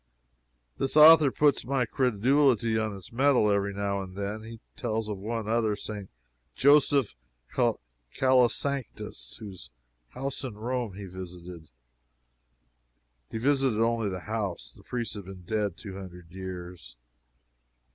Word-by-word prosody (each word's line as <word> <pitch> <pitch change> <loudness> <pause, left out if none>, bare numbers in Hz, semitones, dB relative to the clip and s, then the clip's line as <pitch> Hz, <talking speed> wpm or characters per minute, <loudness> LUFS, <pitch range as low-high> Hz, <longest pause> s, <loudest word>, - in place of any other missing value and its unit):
This 135 +3 0
author 155 -1 +9
puts 145 +2 +2
my 130 0 0
credulity 125 0 +2
on 110 -2 -1
its 95 - -12
mettle 125 -3 +3
every 100 0 +1
now 100 0 -2
and 95 -1 -9
then. 100 +2 -4
He 115 +1 -10 0.2
tells 110 -4 -2
of 105 -2 -4
one 110 +2 -3 0.3
St. 100 -1 -7 0.5
Joseph 140 -3 +4 0.4
Calasanctius 115 - 0
whose 100 -5 -10 0.4
house 135 - -4
in 125 -5 -5
Rome 120 -2 -3
he 100 0 -7
visited; 90 -3 -9 1.6
he - - -4
visited 135 -2 +2
only 115 -2 +1
the 90 -1 -5
house 105 -3 -4
the - - -17
priest 120 -3 -4
has 100 -2 -7
been 95 -1 -10
dead 105 -1 -1
two 100 -6 -8
hundred 90 -3 -11
years. 90 -8 -8
110 Hz, 125 wpm, -28 LUFS, 95-125 Hz, 1.6 s, author